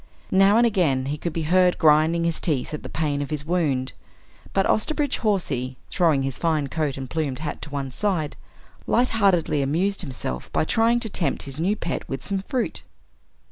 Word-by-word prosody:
Now 195 +3 +5
and 240 - +5
again 165 - +2
he 145 +2 -2
could 170 - -3
be 160 +1 -3
heard 180 +3 +3
grinding 160 +2 +4
his 170 -1 0
teeth 150 -5 0
at 150 - -4
the - - -8
pain 150 -2 -1
of 145 - -4
his 150 -2 -3
wound, 150 -7 0 0.6
but 195 - +2
Osterbridge 290 +4 0
Hawsey, 140 - -1
throwing 160 -7 +2
his 135 -1 -3
fine 155 -4 0
coat 150 -3 -1
and 135 -1 -5
plumed 145 -3 -2
hat 155 0 -5
to - - -6
one 140 -2 -4
side, 170 -2 -1 0.5
lightheartedly 200 - +2
amused 180 +9 0
himself 125 - -5
by - - +1
trying 230 +6 +3
to 225 - -3
tempt 175 - -1
his 135 +1 -7
new 190 +6 +1
pet 170 - -4
with 135 -1 -4
some 200 -1 -1
fruit. 245 +5 -3
160 Hz, 185 wpm, -24 LUFS, 140-195 Hz, 0.6 s, Now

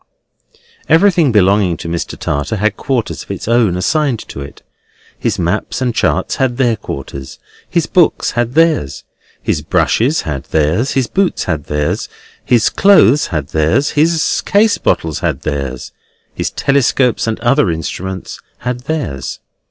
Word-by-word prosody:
Everything 170 -5 +4
belonging 100 -4 +3
to 85 - -7
Mr. 85 0 -4
Tartar 75 +9 -2
had 105 +1 0
quarters 130 -5 -2
of - - -13
its - - -5
own 115 -6 +2
assigned 140 - +1
to 70 - -7
it: 70 +1 -10 0.6
his - - -1
maps 90 +5 -1
and 125 -2 0
charts - - 0
had 130 -3 0
their 120 -4 +2
quarters; 70 -7 -7 0.3
his 170 -2 +1
books 175 -3 +2
had 120 +2 -2
theirs; 160 - +2 0.4
his - - 0
brushes 135 +8 +1
had 70 -4 -5
theirs; 80 - 0
his 135 -2 +1
boots 190 +7 0
had 80 -5 -3
theirs; 75 0 -2 0.3
his 120 -3 +3
clothes 150 - +5
had 75 -6 -3
theirs; 80 - +1
his 160 +1 +1
case 205 +2 +3
bottles 80 -2 0
had - - -2
theirs; 70 -4 -4 0.4
his - - -2
telescopes 135 -3 +1
and 110 - -2
other 120 -1 +3
instruments 90 +3 -5 0.2
had 125 0 -3
theirs. 70 - -3
115 Hz, 145 wpm, -15 LUFS, -, 0.6 s, clothes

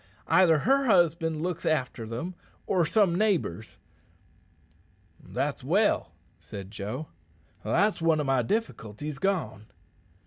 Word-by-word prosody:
Either 170 -4 +5
her 270 - +2
husband 165 - +2
looks 175 -2 -3
after 125 -7 -1
them 125 +11 -5 0.3
or 175 -5 +1
some 200 -3 +3
neighbours." 175 - -1 1.5
"That's - - -3
well," - - +2 0.3
said 100 -1 -9
Joe. 110 +8 -5 0.6
"That's 185 - +1
one 165 -1 +3
o' - - 0
my 135 -2 +2
difficulties 140 - -3
gone." 170 - -2
160 Hz, 110 wpm, -27 LUFS, 120-185 Hz, 1.5 s, Either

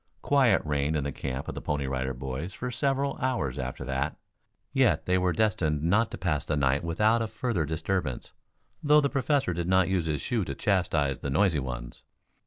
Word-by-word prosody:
Quiet 135 -4 +4
reigned 75 +1 0
in 75 - 0
the 70 - -2
camp 65 0 -5
of - - -4
the - - -6
Pony 75 -2 -1
Rider 65 0 -2
Boys 65 +8 -5
for 125 0 -4
several 140 +1 0
hours 95 - -1
after 65 0 -4
that. 65 +3 -2 0.6
Yet - - +3
they 90 - +2
were 90 0 +2
destined 80 -6 +1
not 105 +7 +3
to - - -7
pass 85 -5 -1
the 75 - -1
night 70 +1 +2
without 105 +8 +2
a 115 - -1
further 110 -5 -1
disturbance, 80 -2 -2 0.5
though 150 0 +5
the 140 - +1
Professor 135 -6 +1
did 85 0 -3
not 95 -1 +3
use 90 -4 0
his 75 -2 -1
shoe 120 -5 -1
to 70 - -4
chastise 80 -9 +1
the 70 - -4
noisy 80 +2 +2
ones. 60 -2 -6
80 Hz, 195 wpm, -28 LUFS, 70-110 Hz, 0.6 s, though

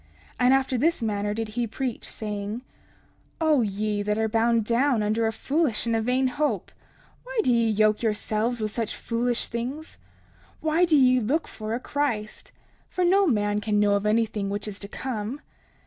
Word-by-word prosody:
And 250 0 +5
after 265 -2 +2
this 320 -2 +1
manner 205 -1 -1
did 225 -1 -3
he 235 +2 -2
preach, 245 +2 -4
saying: 210 +1 -4 0.8
30:13 - - -18
O 310 -4 +4
ye 210 0 -1
that 210 +1 -1
are 220 0 +1
bound 225 0 +2
down 240 0 +2
under 220 +2 +1
a - - 0
foolish 270 0 0
and 230 -1 +1
a 225 - +1
vain 250 +3 +1
hope, 290 +4 -1 0.5
why - - -4
do 250 - +3
ye 230 -1 +3
yoke 215 0 +3
yourselves 220 +1 0
with 215 -1 -2
such 225 -1 -3
foolish 240 +1 -1
things? 255 +7 -5 0.6
Why 320 +3 +2
do 320 -3 +4
ye 255 -2 +5
look 270 +8 0
for 215 0 -4
a - - -3
Christ? 250 -7 -3 0.4
For 365 - 0
no 390 +2 +4
man 210 -5 +1
can 210 0 +1
know 205 -1 +4
of 200 +1 +1
anything 215 -2 +1
which 205 +1 -3
is 205 -1 -6
to 200 - -7
come. 235 +3 -4
230 Hz, 185 wpm, -25 LUFS, 210-260 Hz, 0.8 s, And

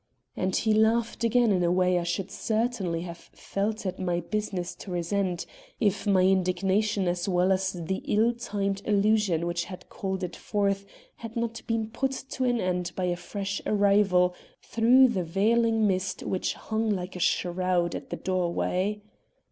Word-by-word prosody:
And 185 0 -1
he 220 -1 +2
laughed 225 +2 +2
again 235 0 +3
in 180 -2 +2
a 170 - +2
way 180 0 +3
I - - -2
should 180 +3 -3
certainly 215 -7 -1
have 170 -1 -7
felt 210 +2 -3
it 185 0 -3
my 175 -2 0
business 190 -1 -3
to - - -10
resent, 180 0 -1 0.3
if 205 -2 +1
my 190 -2 +4
indignation 190 +2 +2
as 175 +2 -1
well 180 +1 +3
as 190 0 +1
the 180 +2 -3
ill 225 +3 +3
timed 200 -4 -2
allusions 205 -5 +2
which 175 0 -1
had 185 -2 -10
called 190 -1 -4
it 175 -1 -4
forth 200 -1 -1 0.3
had 230 0 -8
not 230 0 -2
been 225 -2 0
put 265 +3 -1 0.2
to 260 - -1
an 245 -1 +2
end 180 -2 -1
by 185 - -2
a 180 -1 +1
fresh 195 +2 -4
arrival 200 -3 +3 0.3
through 250 +3 +5
the 190 -6 -1
veiling 225 +5 +2
mist 190 -1 -1
which 185 - -1
hung 220 0 -2
like 185 -3 -2
a - - -5
shroud 175 0 +1
at - - -6
the - - -4
doorway. 185 +3 -1
195 Hz, 170 wpm, -27 LUFS, 180-215 Hz, 0.3 s, through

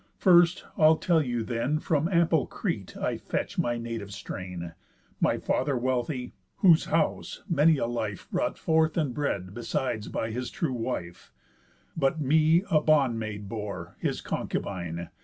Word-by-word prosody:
First, 175 -1 +5 0.2
I'll 155 0 +7
tell 165 0 +2
you 120 -5 -2
then, 120 +6 -1
From 155 +1 0
ample 170 -5 +3
Crete - - -4
I - - -1
fetch - - -3
my 120 0 +1
native 115 -3 -5
strain; 90 -4 -6 0.5
My - - +2
father 140 -3 0
wealthy, 125 +1 -2 0.2
whose 170 -5 +5
house 160 0 -1
many 160 -3 +4
a 120 - 0
life 110 -5 -4
Brought - - -1
forth 160 0 +2
and 150 -6 0
bred 100 -11 -2
besides 120 -1 -2
by 110 - -3
his 125 +2 -3
true 165 -11 -2
wife, 115 -8 -5 0.6
But 155 +1 +1
me 155 +4 +4
a 155 -3 +5
bond 140 -7 +3
maid 105 -2 -5
bore, 100 -5 -6
his - - -2
concubine. 85 -3 -4
125 Hz, 150 wpm, -27 LUFS, 110-155 Hz, 0.6 s, I'll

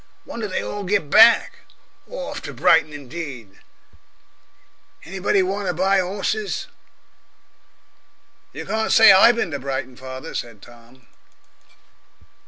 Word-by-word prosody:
Wonder 225 -2 -6
they 185 - -3
all 205 - -6
get 190 -6 -1
back. 225 +2 +5 0.5
Orf - - -7
to - - -9
Brighton 160 -1 +3
indeed! 140 - -9 1.5
Anybody 190 +2 0
want 195 +1 -3
to 180 - -2
buy 190 +2 +2
'orses?" 200 +3 -3 1.9
"You - - -8
can't 220 0 -2
say 225 - +8
I 190 +5 +7
bin 230 -8 -3
to 145 - -4
Brighton, 130 -1 -5
father," 130 +4 -9
said 115 -3 -6
Tom. 120 +2 -19
180 Hz, 115 wpm, -21 LUFS, 130-205 Hz, 1.9 s, say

